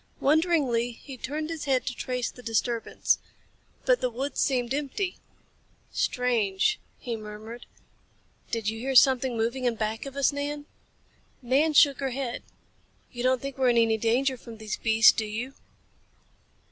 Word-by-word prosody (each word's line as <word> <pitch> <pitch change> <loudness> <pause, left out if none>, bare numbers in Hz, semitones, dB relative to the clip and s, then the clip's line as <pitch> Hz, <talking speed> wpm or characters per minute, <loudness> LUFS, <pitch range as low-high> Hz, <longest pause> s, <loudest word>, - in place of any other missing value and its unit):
Wonderingly, 280 -7 +2
he 265 +3 -10
turned 305 +5 -4
his 320 -2 -5
head 265 -2 +1
to 250 - -2
trace 250 -1 -3
the 250 - -13
disturbance. 230 0 0 0.7
But - - +3
the 250 - +1
woods 260 +4 -4
seemed 250 -2 +1
empty. 295 +7 -2 0.7
"Strange," 245 - +1 0.2
he 240 -3 -4
murmured. 215 +2 -9 0.8
"Did 225 -3 -2
you 220 +1 -1
hear 265 +3 -2
something 260 -1 +5
moving 235 +3 -1
in 240 -2 +2
back 220 +3 -3
of 275 - -9
us, 280 +1 +3
Nan?" 290 +1 -4 0.8
Nan 280 +6 +2
shook 285 -2 +6
her 270 -1 -1
head. 255 -1 -4 0.7
"You 240 - -6
don't 255 0 +2
think 275 -1 -6
we're 255 -1 +4
in 240 - +3
any 225 -1 +4
danger 255 +4 +1
from 230 -1 -11
these 215 -1 -4
beasts, 225 0 +6
do 220 - -3
you?" 235 +5 -4
250 Hz, 155 wpm, -27 LUFS, 230-275 Hz, 0.8 s, shook